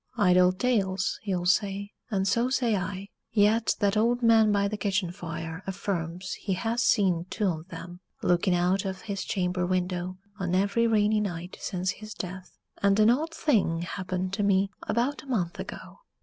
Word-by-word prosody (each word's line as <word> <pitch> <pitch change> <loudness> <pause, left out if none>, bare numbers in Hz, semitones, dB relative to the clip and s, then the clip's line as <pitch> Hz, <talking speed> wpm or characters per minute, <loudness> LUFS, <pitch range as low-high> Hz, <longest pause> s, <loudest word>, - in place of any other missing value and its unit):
Idle 180 -3 +5
tales, 195 -3 0
you'll 180 -3 -1
say, 200 +2 +1 0.2
and 195 -3 0
so 235 +5 +2
say 245 -4 +1
I. 190 +1 -4 0.2
Yet 215 +1 +3
that 200 0 +2
old 235 +3 +2
man 225 -2 +5
by 200 -1 +2
the 210 - -3
kitchen 195 -4 -1
fire 165 -2 -6
affirms 185 -2 -3
he 195 - -1
has 225 +6 -1
seen 185 -7 +2
"two 215 - -1
on 165 -4 -1
'em" 175 +1 -8 0.2
looking 180 +1 +3
out 180 +2 +2
of 190 -1 -4
his 200 -3 -3
chamber 180 -1 -1
window 180 0 -1 0.2
on 180 -1 0
every 200 +5 +2
rainy 215 -1 +3
night 180 -3 -4
since 185 0 -1
his 215 +2 -9
death 185 0 -7 0.2
and 200 +1 +3
an 215 +2 +6
odd 310 +6 0
thing 195 - +1
happened 185 +1 -3
to 200 - -1
me 200 -1 +2 0.2
about 245 +6 0
a - - -17
month 185 -10 -1
ago. - - -8
195 Hz, 175 wpm, -27 LUFS, 180-215 Hz, 0.2 s, an